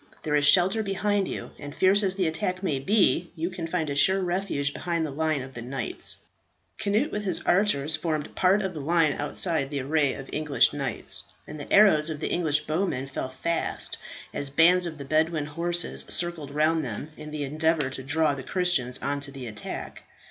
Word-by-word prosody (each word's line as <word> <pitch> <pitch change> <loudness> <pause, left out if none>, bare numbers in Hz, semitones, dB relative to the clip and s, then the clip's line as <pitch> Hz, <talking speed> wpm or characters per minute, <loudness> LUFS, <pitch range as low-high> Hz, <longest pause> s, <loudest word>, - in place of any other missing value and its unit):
There 150 - -2
is 145 0 +4
shelter 190 +7 +5
behind 200 -1 0
you, - - -6
and 145 -1 -8
fierce 195 +2 +4
as 190 -2 0
the 190 -2 0
attack 185 +3 -2
may 150 -8 0
be, 180 +1 +2
you 170 +2 -3
can 175 -3 -5
find 165 -2 -2
a 140 - -2
sure 190 +7 +5
refuge 175 -6 -1
behind 170 -2 -2
the 150 - -5
line 155 -1 -1
of 130 0 -11
the 120 - -7
knights." 130 +2 -2 0.6
Cnut 215 +9 0
with 210 - -3
his 185 -5 +1
archers 160 -6 +2
formed 155 -2 -3
part 195 +3 +2
of 190 -1 -3
the 155 - -6
line 160 0 +2
outside 145 0 0
the 140 -2 -3
array 145 +1 +1
of 135 - -9
English 150 -2 +2
knights, - - -1 0.2
and 150 - -9
the 145 - -9
arrows 180 -7 +5
of 155 -2 -5
the - - -3
English 155 -4 +1
bowmen 155 -5 -2
fell 135 -1 -5
fast 165 +6 -1 0.4
as 140 - -1
bands 175 +5 +4
of 160 -2 -7
the 140 - -8
Bedouin 155 +1 +1
horse 170 +3 -1 0.2
circled 170 -4 -1
round 155 +2 +1
them 130 +5 -6
in 150 0 -9
the 150 -1 -4
endeavour 155 0 0
to 130 - -3
draw 150 +2 +1
the 140 - -6
Christians 140 -6 0
on 140 0 -1
to 140 0 -6
the 135 -2 -8
attack. 105 -2 -6
155 Hz, 200 wpm, -26 LUFS, 145-180 Hz, 0.6 s, shelter